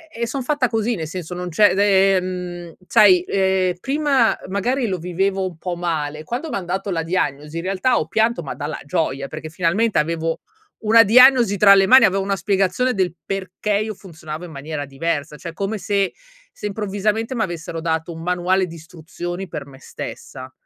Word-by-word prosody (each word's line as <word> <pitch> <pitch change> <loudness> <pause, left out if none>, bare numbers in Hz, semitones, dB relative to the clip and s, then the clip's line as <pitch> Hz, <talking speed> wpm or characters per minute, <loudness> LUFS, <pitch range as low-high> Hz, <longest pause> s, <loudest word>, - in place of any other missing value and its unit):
E 230 - -7
e 235 - 0
son 265 +3 -3
fatta 285 -1 +1
così, 225 +1 0
nel 160 -5 -5
senso, 175 +1 -6
non 180 0 -5
c'è 205 +5 +4
d - - -3
ehm, 185 -3 +1
sai, 185 -4 +6
ehm, 190 -1 +1
prima, 275 -2 +2
magari, 240 +7 0
lo 190 -3 -2
vivevo 190 +3 -1
un 175 -3 -9
po' 180 +1 -4
male; 155 -3 -3
quando 250 - -4
m'han 190 - -3
dato 190 +3 -3
la 165 -2 -1
diagnosi, 150 -3 -2
in 165 - -3
realtà, 195 +7 +1
ho - - -2
pianto, 220 +3 +1
ma 140 - -5
dalla 150 +1 -5
gioia, 140 -2 -1
perché, 155 +1 -8
finalmente, 185 +7 0
avevo 165 +1 -2 0.4
una 225 +1 +5
diagnosi 240 -1 +6
tra 200 0 +7
le 195 0 +5
mani, 260 +1 +8
avevo 195 0 +1
una 195 0 -1
spiegazione, 195 +5 +1
del 185 -5 0
perché 195 +2 -4
io 215 0 -3
funzionavo 160 -4 -9
in 170 - -11
maniera 145 0 -5
diversa. 145 +2 -3
Cioè, 170 0 -8
come 200 +5 -3
se 195 0 0 0.4
se, - - -9
improvvisamente, 210 +3 -2
m'avessero 170 -6 -3
dato 160 0 -2
un 165 - -9
manuale 180 +2 +1
di 170 - -10
istruzioni, 175 +3 -7
per 150 -4 -6
me 135 -1 -14
stessa 130 -1 -9
185 Hz, 185 wpm, -21 LUFS, 165-210 Hz, 0.4 s, mani